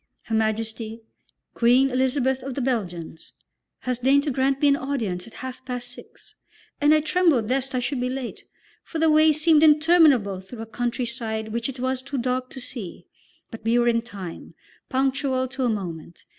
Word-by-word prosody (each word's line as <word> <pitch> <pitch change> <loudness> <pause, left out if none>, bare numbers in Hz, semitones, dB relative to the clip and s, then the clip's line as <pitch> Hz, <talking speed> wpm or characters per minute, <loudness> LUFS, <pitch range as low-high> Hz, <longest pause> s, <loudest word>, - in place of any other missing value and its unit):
Her 225 - -6
Majesty, 220 +1 -2 0.5
Queen 250 +3 +4
Elizabeth 260 0 +1
of 265 -1 -6
the 275 - -2
Belgians, 180 -10 -4 0.5
has 250 -1 -2
deigned 275 +3 +4
to 295 - -1
grant 265 +1 +1
me 290 - +4
an 280 - +5
audience 230 -11 -3
at 230 - -14
half 255 0 -7
past 245 -1 -5
six, - - -15 0.5
and 295 +1 +5
I 310 0 +5
trembled 300 -7 +2
lest 265 0 0
I - - +2
should 255 +1 -2
be 250 - 0
late, 255 -2 -6 0.4
for 330 - -6
the 320 0 +3
way 310 +1 +6
seemed 310 0 +4
interminable 300 - +5
through 225 +4 -9
a - - -7
countryside 235 -1 -3
which 235 +3 -2
it 265 -1 -7
was 260 0 -1
too 275 +1 -5
dark 255 +1 -1
to 265 - -9
see; 240 -8 -7 0.5
but 225 -2 -9
we 230 +2 +2
were 240 0 +3
in 230 -1 +3
time, 200 -7 -9 0.3
punctual 265 0 0
to 265 0 -2
a - - +2
moment. 175 -6 -5
255 Hz, 185 wpm, -24 LUFS, 225-275 Hz, 0.5 s, way